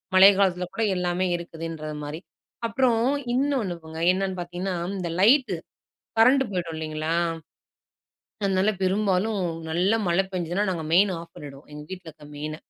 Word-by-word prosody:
மழை 195 +2 +10
காலத்தில 180 -2 +2
கூட 225 - -1
எல்லாமே 180 +1 0
இருக்குதுன்றதுமாரி. 160 -2 -6 0.5
அப்புறம், 235 -1 +2 0.3
இன்னோன்னு 260 -9 0
போங்க. 160 0 -8
என்னன்னு 190 -1 -2
பார்த்தீங்கன்னா, 180 +2 -4 0.2
இந்த 175 -3 -3
லைட்டு 235 -2 +5 0.6
கரண்ட் 260 +4 +6
போயிடும், 170 -3 -3
இல்லேங்களா! 155 +1 -2 1.3
அதனால, 195 +1 +2
பெரும்பாலும் 195 +1 +1 0.3
நல்ல 180 +6 +2 0.2
மழை 180 +3 +3
பெஞ்சுதுனா, 180 +3 -1
நாங்க 165 -3 -3
மெயின் 195 +1 +5
ஆஃப் 165 0 -12
பண்ணிடுவோம். 140 -1 -11
எங்க 150 - -8
வீட்ல 180 -3 -8
இருக்கிற 150 -1 -15
மெயின. 155 +1 -4
180 Hz, 130 wpm, -25 LUFS, 165-200 Hz, 1.3 s, மழை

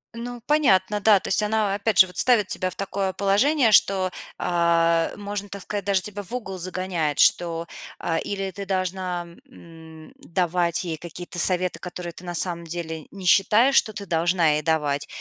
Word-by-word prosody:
Ну, 240 +1 -7
понятно, 210 -10 +2
да, 205 -1 +5
то - - -7
есть 195 - +4
она, 210 -1 0
опять 205 0 -1
же, 185 - +9
вот 180 -2 -12
ставит 235 -6 +3
тебя 185 - -2
в 180 - -12
такое 195 -1 -3
положение, 225 +7 +2
что, 190 -2 +3 0.3
а, 170 -1 +1
можно 205 0 -6
так 200 -1 -8
сказать, 205 -2 -5
даже 195 -2 +1
тебя 205 0 -6
в 200 - -14
угол 195 -7 -5
загоняет, 180 -4 -2
что, 170 -1 +2 0.3
а, 165 -1 -2
или 195 -1 -4
ты 200 +1 -8
должна, 185 -2 -2 0.2
м, 160 -7 -14
давать 175 0 -1
ей 165 -3 -4
какие-то 175 +2 -8
советы, 180 -1 +3
которые 175 -1 -7
ты 170 - -13
на 175 0 -5
самом 170 0 +2
деле 160 -2 -6
не 195 -2 -10
считаешь, 215 +8 +4
что 215 - +3
ты 200 -1 -7
должна 170 0 +1
ей 150 0 0
давать, 150 -2 -1
185 Hz, 180 wpm, -23 LUFS, 170-200 Hz, 0.3 s, же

